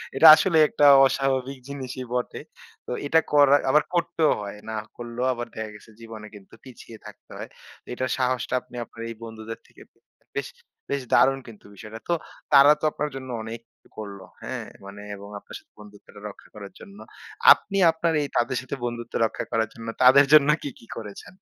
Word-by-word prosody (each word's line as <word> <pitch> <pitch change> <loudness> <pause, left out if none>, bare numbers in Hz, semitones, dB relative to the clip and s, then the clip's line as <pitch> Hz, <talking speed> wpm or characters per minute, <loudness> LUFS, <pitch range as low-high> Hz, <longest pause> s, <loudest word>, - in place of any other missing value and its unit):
এটা 160 +4 +7
আসলে 165 +1 +1
একটা 145 - +1 0.2
অস্বাভাবিক 135 0 -1
জিনিসই 130 -2 -6
বটে। 125 0 -3 0.4
তো - - -8 0.2
এটা 160 - +4
করা 145 -1 +6
আবার 150 +3 +4
করতেও 165 -2 +1
হয়। 100 0 -7
না 110 - -4 0.2
করলেও 120 +1 -5
আবার 120 -1 -6
দেখা 110 -1 -5
গেছে 105 +2 -16
জীবনে 110 -2 -10
কিন্তু 100 -2 -16
পিছিয়ে 120 -3 -13
থাকতে 105 -1 -14
হয়। - - -8 0.4
এটার 130 +1 -3
সাহসটা 130 0 -1
আপনি 125 - -17
আপনার 115 0 -13
এই 115 - -7
বন্ধুদের 110 0 -8
থেকে - - -19 0.6
বেশ - - -2 0.4
বেশ 140 -1 -1
দারুণ 135 0 +4
কিন্তু 110 -3 -14
বিষয়টা। 110 +3 -10
তো 175 - +1 0.4
তারা 140 +1 +8
তো - - -26
আপনার 150 0 -3
জন্য 130 -1 -8
অনেক 115 +1 -7 0.3
অ - - -20
করলো। 100 -3 -8 0.2
হ্যাঁ? - - -5 0.2
মানে 100 +1 -10
এবং 100 +1 -12
আপনার - - -13
সাথে - - -32
বন্ধুত্বটা 105 0 -15
রক্ষা - - -16
করার 100 -2 -10
জন্য। 200 0 -14 0.6
আপনি 195 - -7
আপনার 165 +1 -1
এই 145 - -2
তাদের 120 +1 0
সাথে 130 +1 -6
বন্ধুত্ব 120 -1 -6
রক্ষা - - -4
করার 110 -1 0
জন্য 115 0 -10 0.2
তাদের 135 +3 +7
জন্য 150 -1 +7
কি, 145 - -4
কি - - -17
করেছেন? 105 - -10
125 Hz, 180 wpm, -24 LUFS, 110-140 Hz, 0.6 s, তারা